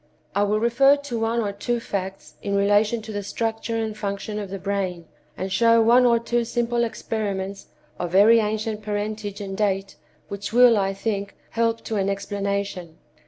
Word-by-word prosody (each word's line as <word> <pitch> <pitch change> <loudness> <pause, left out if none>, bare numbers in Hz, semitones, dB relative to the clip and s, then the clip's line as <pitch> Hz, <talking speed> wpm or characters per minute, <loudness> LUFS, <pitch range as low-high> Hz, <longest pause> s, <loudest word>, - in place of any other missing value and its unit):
I 200 - +1
will 205 +1 +2
refer 250 +5 +5
to 285 -5 -5
one 225 +1 0
or 205 -2 -1
two 235 +4 -2
facts 195 -3 -5
in 200 -1 -2
relation 205 +3 +2
to 220 - -7
the 205 -1 -3
structure 225 +2 -3
and 220 -1 -2
function 210 0 -4
of 200 -2 -5
the 195 - -4
brain, 190 -3 -3 0.3
and 190 0 -3
show 230 +3 +5
one 240 +2 +5
or 235 -1 +4
two 235 +1 0
simple 235 0 0
experiments 200 -4 -3 0.3
of 175 -1 -3
very 215 +4 +7
ancient 215 0 -2
parentage 210 0 -4
and 195 -1 -5
date, 195 -4 -1 0.3
which 200 +1 -5
will, 245 0 +7
I 195 -1 0
think, 200 -1 -3 0.2
help 230 0 0
to 220 - -3
an 195 0 +1
explanation. 200 -4 -3
210 Hz, 175 wpm, -24 LUFS, 200-230 Hz, 0.3 s, very